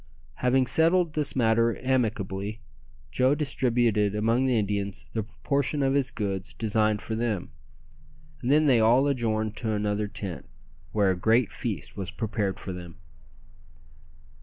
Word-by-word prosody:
Having 130 +1 +2
settled 165 +3 +3
this 150 -2 -1
matter 115 -2 +2
amicably, 110 -5 -1 0.5
Joe 130 +2 +3
distributed 120 -8 +1
among 115 +5 +2
the 125 -3 +2
Indians 100 -2 -2
the 110 - 0
proportion 140 +6 -1
of 135 0 +2
his 140 -2 +1
goods 100 -3 -4
designed 110 -1 +1
for 110 - -4
them; 110 -7 -2 0.9
and 120 - -2
then 150 +2 +4
they 130 -5 +5
all 120 +5 +4
adjourned 110 -6 -1
to 110 -2 -1
another 105 0 -1
tent, 100 -3 -6 0.4
where 100 -3 +2
a - - 0
great 110 +5 +2
feast - - -5
was 95 -3 -4
prepared 105 -4 -2
for 95 - -6
them. 90 -2 -9
110 Hz, 140 wpm, -27 LUFS, 105-130 Hz, 0.9 s, they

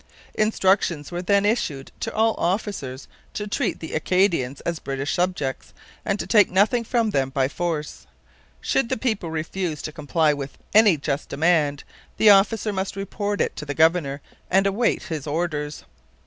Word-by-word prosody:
Instructions 190 -7 +1
were 175 0 -3
then 200 +2 +2
issued 165 - -1
to - - -3
all 225 0 +2
officers 170 - -2 0.3
to 210 - -3
treat 205 - -2
the 160 - -7
Acadians 165 -6 +1
as 170 -2 -3
British 135 +1 -3
subjects, 175 -7 -2 0.3
and 200 +1 -1
to - - -3
take 210 -4 +5
nothing 210 +6 +2
from 230 -1 0
them 135 -6 0
by 135 -1 +1
force. 155 0 -4 0.5
Should 240 -3 0
the - - 0
people 220 -8 -1
refuse 160 0 -3
to 155 - -4
comply 150 +1 +1
with 140 -1 -6 0.2
any 210 -6 +6
just 140 0 -3
demand, 150 -3 +1 0.3
the 215 -1 +7
officer 205 +2 +3
must 190 0 -3
report 205 +1 -3
it - - -1
to - - -5
the 145 -1 -5
governor 160 -3 +2 0.3
and 195 +2 +3
await 200 +5 +1
his 155 -4 -5
orders. 150 -1 -3
175 Hz, 160 wpm, -23 LUFS, 150-205 Hz, 0.5 s, the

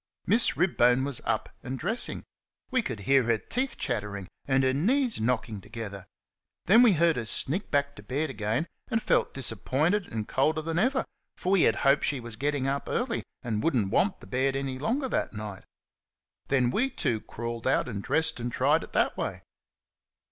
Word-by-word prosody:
Miss 235 +2 +3
Ribbone 130 -8 +3
was 140 -4 -3
up - - 0
and 130 +1 -5
dressing. 210 - 0 0.5
We 255 -1 +3
could 120 - -5
hear 135 +7 +4
her 115 -1 +2
teeth 255 - -3
chattering 105 - -3 0.2
and 135 -1 +3
her 130 0 +3
knees 235 - +1
knocking 110 -3 -1
together. 100 -3 -7 0.6
Then 220 +6 +7
we 235 -5 +6
heard 165 -2 +3
her 120 - -2
sneak 155 - -2
back 140 0 0
to - - -9
bed 140 +8 -2
again 115 +5 -1 0.2
and 225 - 0
felt - - +1
disappointed 140 - +1
and 110 -1 -4
colder 155 +5 +1
than 165 +1 -1
ever, 260 +5 +2 0.3
for 185 - -2
we 195 -3 +5
had 110 - -1
hoped 140 +1 +5
she 140 - 0
was 120 -2 -7
getting 145 +2 -1
up 140 +1 -1
early, 245 -1 -1 0.2
and 110 -3 -1
would 165 - +2
n't 100 -5 +1
want 195 - +1
the - - -11
bed 135 +1 0
any 135 -1 -3
longer 255 - 0
that - - -1
night. 105 -3 -7 0.8
Then 130 -3 +2
we 250 - +1
too 120 - -1
crawled 115 0 -5
out 130 - +2
and 105 -5 -4
dressed 160 +5 +1
and 120 +1 -3
tried - - +2
it - - -12
that - - +2
way. - - -4
135 Hz, 190 wpm, -28 LUFS, 115-170 Hz, 0.8 s, Then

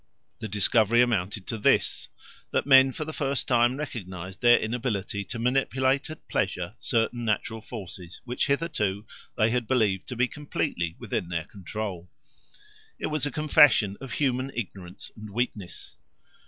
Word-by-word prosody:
The 110 - -4
discovery 110 +3 +3
amounted 105 -4 -1
to 115 - -4
this, - - +2 0.4
that - - 0
men 135 -1 +7
for 155 - -5
the 155 - -6
first 140 -3 -1
time 120 +1 +3
recognised 95 - -6
their 120 0 +7
inability 110 -4 -2
to 120 - -6
manipulate 130 +3 +1
at 155 - -10
pleasure 90 +2 -1
certain 120 0 0
natural 110 0 -1
forces 95 -6 -9
which 125 +4 -1
hitherto 110 - 0 0.3
they 110 0 +3
had 120 -2 0
believed 105 -7 +1
to 125 - -5
be 125 +2 +2
completely 125 - -3
within 85 - -3
their 85 -2 -2
control. 95 -2 -6 0.9
It - - -3
was 150 -2 0
a - - -4
confession 135 -9 +5
of 135 -3 -6
human 130 -1 0
ignorance 95 -5 -6
and 105 -1 -9
weakness. 105 -4 -4
115 Hz, 150 wpm, -27 LUFS, 100-130 Hz, 0.9 s, men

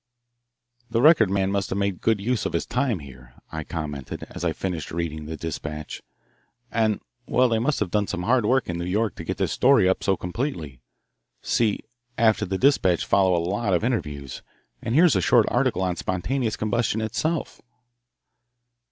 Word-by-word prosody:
"The 115 0 0
Record 140 - +6
man 95 0 +1
must 100 -1 -1
have 95 - -2
made 100 -2 -1
good 110 -2 +2
use 120 +4 0
of - - -7
his 85 - 0
time 125 -4 0
here," 65 -3 -13 0.2
I 80 0 -4
commented, 75 -4 -5
as - - -7
I 85 - +1
finished 85 -2 -4
reading 80 -2 -4
the 80 0 -5
despatch. 75 -2 -6 0.7
"And 110 -2 +1 0.3
well, 130 +1 +3
they 115 -2 +1
must 140 +5 0
have 95 -4 -1
done 105 -1 +1
some 90 - -3
hard 120 +3 +3
work 130 +4 +2
in 85 -1 -3
New 85 - -3
York 105 +4 0
to - - -6
get - - -4
this - - 0
story 125 -7 +4
up 95 - +1
so 95 -2 +2
completely 90 - -4 0.6
see, 110 -3 +1 0.4
after 110 -2 +3
the 95 +1 -1
despatch 95 - +3
follow 95 -2 +3
a 85 0 -1
lot 100 0 0
of 90 - 0
interviews, 75 - -3 0.4
and 115 - -2
here 165 +4 +7
is 165 - +4
a 95 - +2
short - - +4
article 95 - +1
on 90 -1 0
spontaneous 110 +7 -1
combustion 110 0 0
itself." 150 +9 -2
100 Hz, 185 wpm, -24 LUFS, 85-115 Hz, 0.7 s, here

